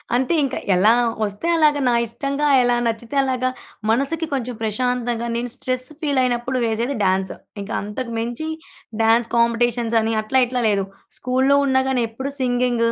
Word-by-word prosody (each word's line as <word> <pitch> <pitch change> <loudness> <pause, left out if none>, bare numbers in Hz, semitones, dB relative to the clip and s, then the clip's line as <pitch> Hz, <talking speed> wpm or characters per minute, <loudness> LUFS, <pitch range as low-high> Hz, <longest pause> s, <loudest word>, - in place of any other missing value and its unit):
అంటే 260 +6 +1
ఇంకా, 270 -1 -2 0.2
ఎలా 205 +5 +5 0.3
వస్తే 205 +10 -5
అలాగా, 300 -2 +4
నా - - +2
ఇష్టంగా 275 +5 -1 0.2
ఎలా 245 0 +2
నచ్చితే 230 +3 -4
అలాగా. 255 -1 0 0.4
మనసుకి 280 +7 0
కొంచెం 250 -2 -2
ప్రశాంతంగా 240 +1 -1
నేను 240 +1 -2
స్ట్రెస్ 255 -1 -3
ఫీలైనప్పుడు 255 -3 0
వేసేది 230 +5 -1
డ్యాన్సు. 190 0 0 0.3
ఇంకా 205 +3 -6
అంతకు 230 +4 -5
మించి 240 +7 -4 0.6
డ్యాన్స్ 230 +1 +3
కాంపిటీషన్స్ 235 0 +2
అని, 225 +1 -1
అట్లా 260 +5 +2
ఇట్లా 250 0 -2
లేదు. 200 -2 +1 0.3
స్కూలులో 260 +2 +2
ఉన్నా 265 -1 +3
గాని 255 -2 +1
ఎప్పుడు 265 +5 -5
సింగింగు 245 -2 +1
245 Hz, 150 wpm, -21 LUFS, 230-260 Hz, 0.6 s, ఎలా